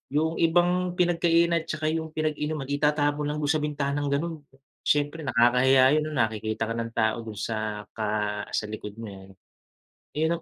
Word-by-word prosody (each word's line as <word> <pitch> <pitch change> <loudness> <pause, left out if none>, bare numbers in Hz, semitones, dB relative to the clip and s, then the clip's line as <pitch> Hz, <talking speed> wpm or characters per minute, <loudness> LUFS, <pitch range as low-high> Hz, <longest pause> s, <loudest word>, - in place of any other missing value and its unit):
Yung 160 +2 +1
ibang 175 +2 +2
pinagkainan 170 -1 +3
at - - -16
saka 155 0 -3
yung 160 -1 -3
pinag-inuman 155 -2 -2
itatapon 150 0 +1
lang 150 - -2
do'n 145 -1 +1
sa 155 - 0
bintanang 145 -1 -1
gano'n, 165 +4 -1 0.6
siyempre 145 +2 +1
nakakahiya 130 0 +4
'yon 155 0 +1
nakikita 110 -1 0
ka 115 - -1
ng 115 0 -3
tao 110 +1 +2
do'n 110 -2 -8
sa 110 -1 -3
ka 110 - -3 0.5
sa - - -1
likod 105 -1 -7
mo 115 - -7
eh 95 0 -13 1.0
ano. 170 +1 0
145 Hz, 160 wpm, -26 LUFS, 115-160 Hz, 1.0 s, nakakahiya